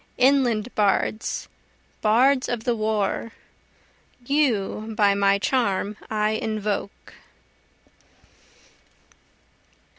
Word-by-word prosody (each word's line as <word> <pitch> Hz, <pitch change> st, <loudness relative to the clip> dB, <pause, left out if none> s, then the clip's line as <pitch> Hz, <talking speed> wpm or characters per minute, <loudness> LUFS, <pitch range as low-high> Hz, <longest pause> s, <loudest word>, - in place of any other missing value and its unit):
inland 250 Hz, -4 st, +2 dB
bards 210 Hz, +1 st, 0 dB, 0.5 s
bards 255 Hz, +5 st, +3 dB
of 240 Hz, -2 st, -3 dB
the 240 Hz, 0 st, 0 dB
war! 215 Hz, +1 st, -1 dB, 0.9 s
You 225 Hz, -6 st, 0 dB
by 205 Hz, -2 st, +4 dB
my 200 Hz, 0 st, +3 dB
charm 205 Hz, -3 st, 0 dB
I 215 Hz, 0 st, 0 dB
invoke. 215 Hz, -2 st, -4 dB
215 Hz, 70 wpm, -24 LUFS, 205-240 Hz, 0.9 s, by